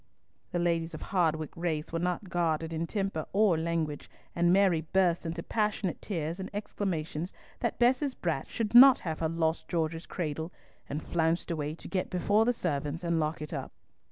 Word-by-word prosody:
The - - -1
ladies 170 -1 0
of - - -7
Hardwicke 160 -5 0
race 165 -2 -2
were 165 - 0
not 180 +3 -1
guarded 165 -2 0
in 165 +1 -2
temper 195 -6 -2
or 200 -3 +4
language, 160 -2 -2 0.3
and 175 0 +3
Mary 185 -4 +4
burst 180 -3 +2
into 170 +1 -4
passionate 210 -5 -1
tears 165 -2 -3
and 190 - -5
exclamations 175 -5 -3 0.3
that 235 - -1
Bess's 260 +3 +2
brat 160 -6 -2
should 225 -2 -2
not 260 +2 +10
have 160 -3 -3
her 160 - 0
lost 160 0 0
George's 165 0 -2
cradle, 160 -1 -3 0.4
and 150 +2 -3
flounced 165 +1 0
away 155 -1 -2
to - - -11
get 185 -2 -2
before 205 +5 +2
the 245 - +4
servants 150 - -2
and 170 -1 +1
lock 155 0 -1
it 150 - -7
up. - - -4
170 Hz, 180 wpm, -30 LUFS, 160-190 Hz, 0.4 s, not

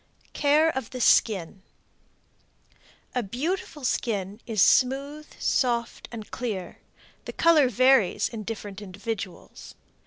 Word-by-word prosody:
CARE 300 +3 +3
OF 265 -4 -4
THE 255 - -7
SKIN. 195 -6 +2 1.5
A 250 - 0
beautiful 295 - -4
skin 205 -4 -2
is 220 -3 -2
smooth, 280 +4 +2
soft 235 -3 -1
and 220 -3 -9
clear; 205 -8 -5 0.5
the - - -6
color 315 -6 +4
varies 255 -4 +3
in 225 -2 -7
different 205 -2 -7
individuals. 200 -1 -7
235 Hz, 105 wpm, -26 LUFS, 205-270 Hz, 1.5 s, color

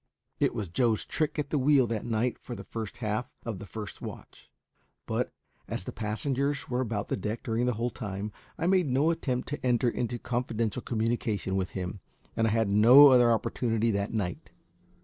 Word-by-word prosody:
It - - +2
was 105 - -2
Joe's 110 +5 +1
trick 155 -1 -1
at 150 -2 -2
the 150 - +2
wheel 135 -1 +5
that 115 -1 -3
night 115 +2 0
for 120 - -7
the - - -8
first 110 -3 -6
half 110 +4 -1 0.2
of 110 -5 -4
the 105 - -9
first 105 -2 -7
watch; - - -10 0.6
but, - - -1 0.4
as - - -4
the - - -5
passengers 130 +6 -2
were 125 0 0
about 110 -4 -2
the - - +1
deck 105 +4 -4
during 115 +2 0
the 125 - +1
whole 120 +3 -1
time, 100 0 -5 0.3
I 165 - -2
made 185 -2 +3
no 140 +5 +3
attempt 130 -6 -2
to 145 -2 -5
enter 120 -1 +2
into 120 +1 -2
confidential 120 -1 -2
communication 110 -4 -1
with 95 -1 0
him, 90 +2 -4 0.4
and 115 0 +2
I - - +2
had 110 -2 +1
no 125 +8 +9
other 120 -2 +6
opportunity 115 0 +1
that 100 0 -1
night. 100 -6 -3
115 Hz, 190 wpm, -29 LUFS, 105-125 Hz, 0.6 s, no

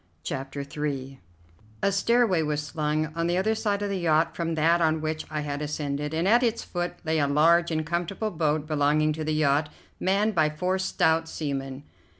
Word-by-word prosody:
CHAPTER 135 +1 -4
III 140 -2 -4 0.6
A 200 - +3
stairway 210 -2 +3
was 150 -1 -1
slung 155 +1 -1
on 165 0 0
the 175 +1 +1
other 215 +4 +2
side 205 -2 -1
of 205 - -1
the 195 -1 -2
yacht 160 -1 +2
from 165 -1 -2
that 165 +2 +3
on 160 -1 +2
which 155 0 -3
I 155 -1 -3
had 145 0 -4
ascended, 150 -1 -3
and 165 +3 0
at 235 +4 +5
its 235 -2 0
foot 175 0 -3
lay 160 0 +1
a 145 - +2
large 165 +4 +4
and 155 -1 -1
comfortable 175 +6 -2
boat 155 -3 0
belonging 155 0 +2
to 155 +1 -4
the 155 0 -1
yacht, 150 0 +2 0.3
manned 205 +3 +1
by 155 -4 +3
four 180 +5 -1
stout 160 -3 +1
seamen. 135 -2 -4
155 Hz, 190 wpm, -26 LUFS, 150-175 Hz, 0.6 s, at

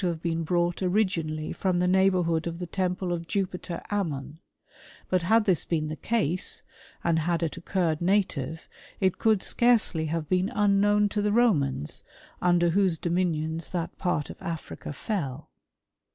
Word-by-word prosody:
125 175 -3 0
have - - -1
been - - -1
brought 175 +1 0
originally 175 -5 0
from 185 -2 0
the 180 - +2
nei^bourhood 180 -3 +2
of 170 0 -4
the 180 - -4
temple 180 0 -1
of 170 -1 -4
Jupiter 180 -3 -3
Ammon: 160 -7 -2 0.7
but 185 -1 +2
had 220 +6 +3
this 185 -6 +2
been 155 -2 -1
the 155 - -3
case, 185 -4 -1 0.4
and 165 -1 +2
had 170 +1 0
it 165 - -2
occurred 170 -2 -1
native, 170 -5 0 0.3
it 190 -2 +1
could 220 -3 +3
scarcely 225 -10 +2
have 160 0 -2
been 185 +3 +1
unknown 205 0 +4
to 210 +1 -1
the 205 0 +1
Romans, 155 - +1 0.4
under 175 -1 +3
whose 190 -2 +2
dominions 165 -2 -1
that 175 -2 -3
part 175 -5 -1
of - - -13
Africa 170 -5 -6
fell. 145 - -4
175 Hz, 155 wpm, -27 LUFS, 160-195 Hz, 0.7 s, unknown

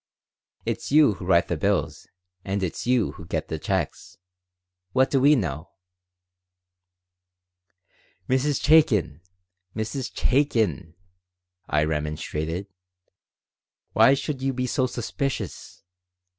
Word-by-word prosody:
"It's - - -3
you 150 -6 +6
who 90 -2 -9
write 85 -2 +4
the 85 - -1
bills, 100 +5 -1 0.4
and 95 0 -2
it's 90 +5 -4
you 125 -4 +2
who 85 - -12
get 80 -3 -3
the 80 - -3
checks. 95 +2 -3 0.8
What 130 +1 +3
do 135 - +2
we 145 +3 +6
know?" 80 - -3 2.6
"Mrs. 130 +2 +1
Chaikin! 105 - +3 0.5
Mrs. 115 +4 -3
Chaikin!" 110 - 0 0.7
I 75 0 +2
remonstrated. 75 +3 -3 1.3
"Why 115 +6 +6
should 140 -1 -4
you 135 0 0
be 125 0 -2
so 130 +1 0
suspicious? 125 +3 -5
105 Hz, 105 wpm, -25 LUFS, 85-130 Hz, 2.6 s, you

